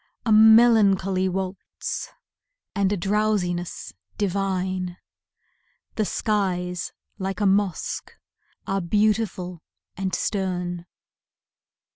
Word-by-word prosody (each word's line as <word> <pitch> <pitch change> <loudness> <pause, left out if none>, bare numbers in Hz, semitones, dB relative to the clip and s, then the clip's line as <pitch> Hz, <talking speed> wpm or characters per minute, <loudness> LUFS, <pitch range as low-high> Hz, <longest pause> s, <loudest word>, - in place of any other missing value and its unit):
A 225 - +1
melancholy 215 -4 +6
waltz 190 +1 -4 0.6
and 200 -1 +1
a 205 - +1
drowsiness 195 -2 -1 0.2
divine, 185 -2 -1 1.0
The 215 - 0
skies 180 -5 -1 0.3
like 190 0 -3
a 205 - +1
mosque 195 -2 0 0.5
are 195 0 -1
beautiful 200 -2 0 0.3
and 190 -2 -2
stern. 180 -3 -2
190 Hz, 80 wpm, -24 LUFS, 180-210 Hz, 1.0 s, melancholy